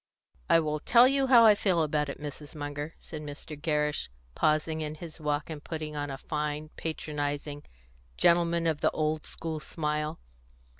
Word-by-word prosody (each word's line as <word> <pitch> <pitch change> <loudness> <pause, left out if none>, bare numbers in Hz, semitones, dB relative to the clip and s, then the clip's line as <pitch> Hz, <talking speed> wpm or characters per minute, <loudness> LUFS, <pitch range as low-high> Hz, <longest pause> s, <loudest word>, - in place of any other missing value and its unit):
"I - - +7
will 155 -1 -1
tell 240 +10 +6
you 275 0 +2
how 240 -3 +8
I 215 - +9
feel 185 -5 +2
about 150 -1 0
it, - - -6
Mrs. 150 0 -7
Munger," 145 +1 -5
said 155 - -8
Mr. 150 +1 -7
Gerrish, 150 - 0 0.2
pausing 155 - +1
in 155 0 -3
his 160 0 -9
walk, 150 0 -1
and 150 -2 -7
putting 155 -2 -5
on 145 0 -3
a 135 - -4
fine, 150 +1 -3
patronising, 145 -2 -3 0.6
gentleman 170 -1 +3
of 160 -3 0
the - - +4
old 155 0 -1
school 160 -1 -5
smile. 150 0 -2
155 Hz, 165 wpm, -29 LUFS, 150-165 Hz, 0.6 s, I